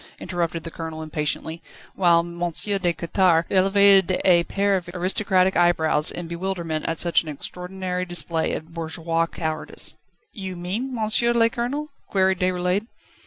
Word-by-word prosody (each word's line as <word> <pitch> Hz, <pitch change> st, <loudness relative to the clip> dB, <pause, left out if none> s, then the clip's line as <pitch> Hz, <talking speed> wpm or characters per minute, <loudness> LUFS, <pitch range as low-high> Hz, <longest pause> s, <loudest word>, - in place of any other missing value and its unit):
interrupted 170 Hz, -2 st, -3 dB
the 165 Hz, -, -7 dB
Colonel 160 Hz, -1 st, -6 dB
impatiently, 155 Hz, +1 st, -3 dB, 0.3 s
whilst 170 Hz, 0 st, +1 dB
M. 200 Hz, -1 st, +2 dB
de 175 Hz, -2 st, +1 dB
Quettare 170 Hz, 0 st, +2 dB
elevated 195 Hz, -1 st, +5 dB
a 175 Hz, -2 st, +5 dB
pair 200 Hz, 0 st, +1 dB
of 180 Hz, -2 st, -3 dB
aristocratic 185 Hz, +1 st, +1 dB
eyebrows 160 Hz, -3 st, +3 dB
in 175 Hz, -1 st, -5 dB
bewilderment 170 Hz, -2 st, -3 dB
at 165 Hz, -, -1 dB
such 170 Hz, -1 st, +3 dB
an 160 Hz, -, -8 dB
extraordinary 180 Hz, +4 st, -4 dB
display 170 Hz, -2 st, 0 dB
of 160 Hz, +1 st, -6 dB
bourgeois 165 Hz, 0 st, -1 dB
cowardice. 155 Hz, -2 st, -4 dB, 0.4 s
"You 190 Hz, -3 st, -6 dB
mean, 210 Hz, +10 st, -3 dB
Monsieur 225 Hz, +2 st, +2 dB
le 230 Hz, -1 st, +4 dB
Colonel?" 275 Hz, +6 st, -3 dB, 0.2 s
queried 190 Hz, -2 st, +2 dB
Déroulède. 185 Hz, +3 st, 0 dB
175 Hz, 140 wpm, -23 LUFS, 165-190 Hz, 0.4 s, elevated